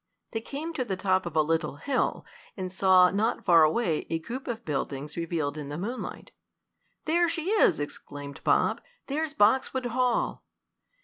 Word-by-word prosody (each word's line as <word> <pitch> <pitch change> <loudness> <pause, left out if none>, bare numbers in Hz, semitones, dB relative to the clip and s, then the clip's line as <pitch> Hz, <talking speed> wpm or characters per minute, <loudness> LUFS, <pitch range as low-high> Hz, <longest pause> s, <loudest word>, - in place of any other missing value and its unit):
They 225 - -3
came 300 +7 -5
to 265 - -1
the 200 -6 -3
top 185 -1 +1
of 170 - -7
a 155 - +5
little 160 -2 -1
hill, 265 - -1 0.3
and 185 -1 -4
saw, 185 -1 +5
not 215 +4 0
far 170 -2 +7
away, 160 +1 +2
a 165 - 0
group 240 +12 -7
of 235 -1 -4
buildings 145 0 -3
revealed 160 -3 -2
in 145 -1 -6
the 145 - -4
moonlight. 230 +8 -5 0.7
"There 340 +2 +3
she 335 +3 -2
is!" 410 - +4
exclaimed 145 -1 -7
Bob. - - +2 0.2
"There's 305 +2 -2
Boxwood 260 +4 +3
Hall!" 245 0 0
190 Hz, 165 wpm, -28 LUFS, 160-255 Hz, 0.7 s, far